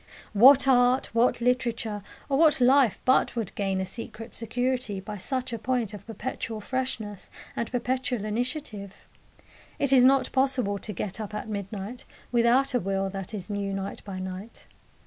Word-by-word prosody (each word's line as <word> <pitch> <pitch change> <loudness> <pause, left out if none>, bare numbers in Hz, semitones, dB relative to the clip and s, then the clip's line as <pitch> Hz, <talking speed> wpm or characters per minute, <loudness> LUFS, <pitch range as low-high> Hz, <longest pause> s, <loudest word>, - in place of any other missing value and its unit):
What 260 +6 +7
art, 250 -1 +3
what 235 +1 +2
literature, 235 -4 0 0.3
or 275 0 +1
what 315 -3 +5
life 255 -2 +4
but 260 0 +3
would 225 -6 -3
gain 195 -2 -1
a 190 - -1
secret 225 +2 -8
security 245 -2 -1
by 210 +2 -7
such 255 +5 -3
a 230 - -3
point 235 -1 -1
of 205 - -10
perpetual 225 0 -5
freshness 220 -4 -4 0.3
and 235 - -3
perpetual 250 -2 -1
initiative? 215 -3 -4 0.7
It 280 -1 +1
is 255 -2 +7
not 270 +1 +4
possible 260 -7 +1
to 210 - -5
get 195 +2 -4
up 210 0 -6
at 210 - -4
midnight 205 +3 -5 0.3
without 245 +3 +3
a 245 - +3
will 195 0 -1
that 195 +2 -6
is 190 -4 -6
new 200 -1 -3
night 195 0 -5
by 195 -2 -6
night. 185 +4 -7
230 Hz, 165 wpm, -27 LUFS, 200-255 Hz, 0.7 s, What